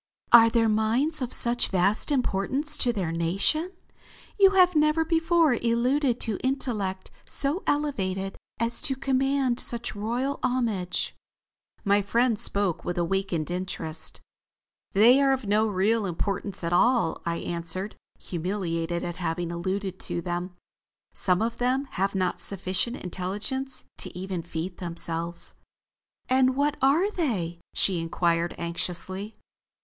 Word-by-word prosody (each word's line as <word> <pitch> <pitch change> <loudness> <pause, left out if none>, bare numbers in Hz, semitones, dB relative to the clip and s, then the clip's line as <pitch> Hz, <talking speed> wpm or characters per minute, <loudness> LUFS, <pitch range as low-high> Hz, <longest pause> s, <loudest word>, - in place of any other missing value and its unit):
"Are 230 -1 +8
their 230 -1 +2
minds 230 +8 +1
of 250 - -3
such 240 0 +3
vast 195 - +1
importance 270 +4 +2
to 245 - +4
their 190 -8 -3
nation? 195 - 0 0.7
You 390 -1 +8
have 365 -2 +5
never 305 +1 +3
before 330 -2 +3
alluded 245 +3 +1
to 220 -4 -1
intellect 215 -8 -2
so 290 +7 -1
elevated 195 -10 -1 0.2
as 230 +1 +1
to 285 -4 +1
command 270 -1 0
such 235 -2 +1
royal 240 +7 -2
homage." 220 -8 -1 0.7
My 200 +1 +3
friend 230 +2 +1
spoke 200 -4 0
with 175 - -4
awakened 175 -2 -1
interest. 170 -3 -2 0.7
"They 240 +7 +6
are 275 -1 +4
of 260 -3 -3
no 215 +2 +2 0.4
importance 190 +2 -2
at 170 +1 -1
all," 205 -3 +2
I 170 0 -2
answered, 175 +5 -2 0.2
humiliated 170 -2 -3
at 175 -1 -5
having 175 -1 -3
alluded 185 +2 -3
to - - -4
them. 175 +1 -4 0.6
"Some 180 +2 +2
of 230 +1 -2
them 255 +3 0
have 195 +2 -1
not 185 -1 -1
sufficient 195 +4 +1
intelligence 205 +9 -3 0.2
to - - 0
even 185 -1 -4
feed 170 +2 -6
themselves." 170 -1 -3 0.7
"And 260 0 +3
what 290 +1 +1
are 310 +10 +3
they?" 195 - -2 0.2
she 185 -3 +3
inquired 170 +1 0
anxiously. 180 +4 -4
205 Hz, 130 wpm, -26 LUFS, 180-260 Hz, 0.7 s, Are